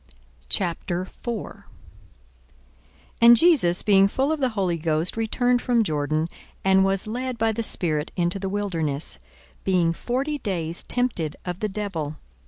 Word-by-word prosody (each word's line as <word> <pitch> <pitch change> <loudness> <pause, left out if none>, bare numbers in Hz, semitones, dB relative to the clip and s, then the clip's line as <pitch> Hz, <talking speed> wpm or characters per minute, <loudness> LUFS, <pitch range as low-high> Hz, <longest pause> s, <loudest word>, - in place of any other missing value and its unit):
42:004:001 185 +4 -2 1.6
And 235 0 +9
Jesus 240 - +4
being 195 -2 +5
full 265 +8 0
of 315 - -1
the 260 -2 +2
Holy 180 -4 0
Ghost 160 +2 0
returned 245 +2 +1
from 240 -3 +2
Jordan, 155 -2 -1 0.4
and 190 0 +5
was 195 0 0
led 250 +3 -3
by 225 0 +2
the 225 +1 -3
Spirit 160 -8 0
into 175 +2 +1
the 195 0 -3
wilderness, 165 -8 -3 0.4
42:004:002 - - -32
Being 175 -3 +2
forty 270 - -2
days 170 -7 -2
tempted 220 -12 -2
of 180 0 -4
the 215 - -1
devil. 185 -8 -4
195 Hz, 140 wpm, -24 LUFS, 170-235 Hz, 1.6 s, And